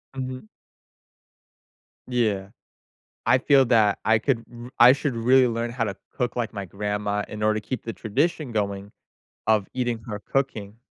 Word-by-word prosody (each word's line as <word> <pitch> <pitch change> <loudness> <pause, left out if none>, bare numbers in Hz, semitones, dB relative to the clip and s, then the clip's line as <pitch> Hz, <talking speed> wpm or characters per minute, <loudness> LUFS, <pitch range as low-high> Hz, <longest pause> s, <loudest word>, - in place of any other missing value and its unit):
Mhm. 130 -3 -5 1.6
Yeah. 110 -6 0 0.8
I 125 - +5
feel 135 0 +4
that 110 -4 +3
I 110 0 +4
could 115 0 0
r 120 0 -10
I 120 +1 +10
should 140 -1 -1
really 125 +2 +4
learn 115 0 -2
how 120 -2 -1
to 100 - -4 0.2
cook 125 -2 -2
like 120 -2 -2
my 100 -2 -5
grandma 105 +2 -2
in 105 - -7
order 110 0 +2
to 105 - -18
keep 130 - -3
the 115 - -5
tradition 140 +5 -1
going 100 -2 -2 0.5
of 110 -3 +2
eating 120 -3 -1
her 105 -2 -4
cooking. 110 -4 -3
115 Hz, 160 wpm, -24 LUFS, 105-125 Hz, 1.6 s, I